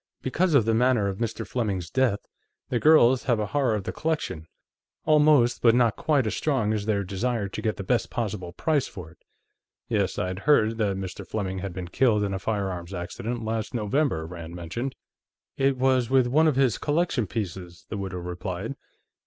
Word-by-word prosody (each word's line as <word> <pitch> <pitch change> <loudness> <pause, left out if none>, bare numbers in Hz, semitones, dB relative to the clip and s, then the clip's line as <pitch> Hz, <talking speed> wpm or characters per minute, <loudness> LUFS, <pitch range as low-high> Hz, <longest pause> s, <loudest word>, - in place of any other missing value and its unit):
"Because 165 +5 +1
of 120 -6 +5
the 115 - +2
manner 120 -3 +3
of 95 -1 -4
Mr. 115 -1 -3
Fleming's 100 -8 -2
death, 130 -6 +1 0.5
the 120 - 0
girls 130 -3 +5
have 120 -4 +2
a 105 - 0
horror 125 +2 +1
of 105 - -3
the - - -3
collection 120 - -3 0.6
almost 150 -5 +4
but 115 -1 +5
not 120 -3 +3
quite 145 -5 +1
as 110 - -1
strong 125 -8 0
as 105 -1 -3
their 100 -2 +1
desire 100 +3 -2
to - - -5
get 110 - -1
the 100 - -4
best 120 +4 0
possible 105 -7 -3
price 145 - 0
for 90 -6 -10
it." 80 - -22 0.7
"Yes. - - 0
I'd 90 +1 -2
heard 115 -5 +4
that 100 -3 0
Mr. 95 -1 -6
Fleming 95 -3 -3
had 95 0 -4
been 90 0 -6
killed 105 +1 +2
in 100 -1 -1
a 95 - -2
firearms 95 -3 -3
accident, 110 +7 -4
last 110 +2 -3
November," 115 - 0
Rand 85 0 -8
mentioned. 115 +10 -4 0.6
"It 135 -1 +1
was 130 -2 +2
with 130 -1 +4
one 150 +6 +3
of 150 - +2
his 130 -4 +2
collection 150 - 0
pieces," 90 -4 -5
the 105 - -4
widow 95 -2 -4
replied. 90 +6 -5
110 Hz, 190 wpm, -26 LUFS, 95-130 Hz, 0.7 s, of